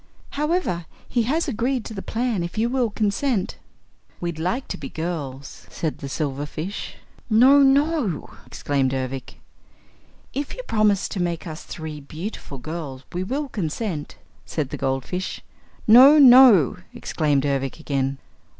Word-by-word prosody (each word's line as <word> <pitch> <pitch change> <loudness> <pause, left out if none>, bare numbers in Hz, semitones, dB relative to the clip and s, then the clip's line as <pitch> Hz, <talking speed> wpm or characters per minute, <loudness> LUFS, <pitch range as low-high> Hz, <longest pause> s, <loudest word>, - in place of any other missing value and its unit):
However, 295 - -1 0.2
he 240 - +1
has 325 +4 +1
agreed 245 -1 -1
to - - -7
the 195 - -5
plan 230 -3 -1
if 170 +4 -5
you 230 +2 +1
will 250 -2 +1
consent." 210 0 -1 0.6
"We'd 170 -2 -4
like 185 +11 -2
to - - -4
be 135 -3 -7
girls," 145 -5 -6
said 160 -3 -4
the 140 - -6
silverfish. 150 +6 -4 0.3
"No, 255 +6 +6
no!" 275 - +2 0.2
exclaimed 135 -2 -1
Ervic. 130 0 -4 1.0
"If 280 +1 -4
you - - -7
promise 210 - +2
to 190 - -3
make 170 -2 -2
us 155 -2 -7
three 155 -2 -7
beautiful 155 0 -7
girls, 140 -1 -6
we 175 - -2
will 280 +9 -2
consent," 175 - -4 0.3
said 145 -4 -3
the - - -3
goldfish. 135 +8 -3 0.4
"No, 260 +7 +9
no!" 250 - +8 0.2
exclaimed 145 -3 0
Ervic 135 0 -1
again. 135 -3 -1
180 Hz, 140 wpm, -23 LUFS, 145-245 Hz, 1.0 s, No